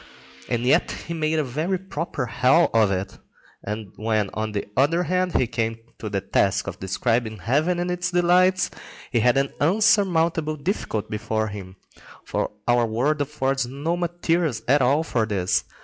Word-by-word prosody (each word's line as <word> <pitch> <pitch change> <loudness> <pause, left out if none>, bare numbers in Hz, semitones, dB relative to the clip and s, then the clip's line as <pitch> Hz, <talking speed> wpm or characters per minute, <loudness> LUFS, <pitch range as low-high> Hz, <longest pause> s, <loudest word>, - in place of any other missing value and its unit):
And 120 0 0
yet 125 - +3 0.2
he 170 - -3
made 160 -1 0
a 155 - +2
very 155 +9 -1
proper 175 -6 -4
hell 130 +7 +3
of 110 -3 +4
it. 95 0 -3 0.4
And 105 -1 -5
when, 110 -2 0
on 110 0 -2
the 100 - -3
other 165 +7 +3
hand, 180 +1 0
he - - +3
came 115 -1 -2 0.2
to 110 - -5
the 100 -1 -1
task - - +1
of - - -6
describing 110 +3 -1
heaven 150 - +1
and 175 +1 -1
its 180 0 -1
delights, 180 +1 +3 0.4
he 120 - +2
had 125 +3 +3
an 135 0 0
insurmountable 170 -4 +2
difficulty 145 - -3
before 110 +1 -1
him, 95 -2 -8 0.5
for - - -1 0.2
our 120 -1 +3
world 135 +7 0
affords 135 -2 -1
no 145 +6 -2
materials 170 -6 -1
at 140 +3 +4
all 140 +5 +3
for 115 -8 0
this. 95 -4 0
135 Hz, 165 wpm, -23 LUFS, 110-170 Hz, 0.5 s, of